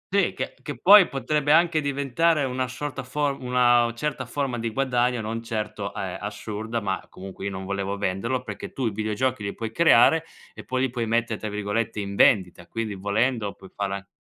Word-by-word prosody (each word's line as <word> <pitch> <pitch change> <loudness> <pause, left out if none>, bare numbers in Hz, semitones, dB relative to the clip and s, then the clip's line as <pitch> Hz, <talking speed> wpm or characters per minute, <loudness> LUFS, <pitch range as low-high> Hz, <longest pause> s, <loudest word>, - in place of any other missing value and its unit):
Sì, 200 -4 +3
che - - -4
che 145 -5 -6
poi 200 +5 +8
potrebbe 145 +2 0
anche 165 -2 +4
diventare 140 +3 +1
una 130 -1 -1
sorta 135 +2 -5
for 140 +2 -1
una 120 -1 +3
certa 150 +4 -3
forma 135 -4 -2
di 115 - -2
guadagno, 125 -1 +1
non 115 +1 -4
certo, 105 -3 -4
eh, - - -4 0.2
assurda, 105 +2 -4
ma 95 -2 -2
comunque 95 +1 -9
io - - 0
non 95 0 -6
volevo 100 0 -2
venderlo, 110 +7 -1
perché - - -7
tu 130 - -2
i 110 - +1
videogiochi 110 +4 -1
li 100 -1 -4
puoi 110 -1 -4
creare 160 +2 +5 0.3
e - - -11
poi 130 0 -1
li 135 - +1
puoi 120 -3 -2
mette' 115 -1 0
tra 110 - -5
virgolette, 105 +2 -2
"in 100 0 -4
vendita", 90 -5 +3
quindi 115 -2 -3
volendo 105 +2 0
puoi 95 - -15
fare 100 -1 -2
a 100 0 -8
115 Hz, 195 wpm, -25 LUFS, 105-135 Hz, 0.3 s, poi